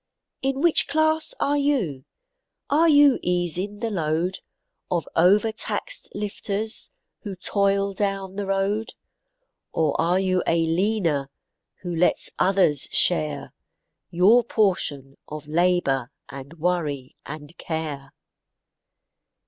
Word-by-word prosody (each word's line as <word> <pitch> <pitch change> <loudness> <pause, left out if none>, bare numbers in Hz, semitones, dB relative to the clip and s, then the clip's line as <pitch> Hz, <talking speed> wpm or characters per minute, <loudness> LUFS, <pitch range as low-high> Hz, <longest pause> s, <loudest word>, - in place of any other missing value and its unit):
In 270 +1 -1
which 340 -1 +3
class 315 +2 +1
are 290 +1 +1
you? 215 - -1 0.7
Are 325 +3 +4
you 290 -3 +5
easing 180 +4 0
the 230 -1 -2
load, 170 0 -1 0.5
Of 170 -4 -1
overtaxed 210 - +1
lifters, 210 +1 -2 0.3
who 200 -4 -6
toil 200 +1 0
down 195 -1 -3
the 200 -1 -4
road? 195 +3 -1 0.8
Or 155 -3 +1
are 175 +3 +2
you 185 -1 +1
a 165 0 +2
leaner, 165 -5 0 0.5
who 175 -2 -4
lets 175 +2 +2
others 185 -7 +3
share 75 -1 +1 0.6
Your 200 +8 +4
portion 165 - -1
of 155 0 -8
labor, 155 -6 +1 0.2
and 140 +3 -10
worry 155 -6 -2
and 150 +2 -9
care? 155 -4 -5
185 Hz, 110 wpm, -24 LUFS, 160-210 Hz, 0.8 s, you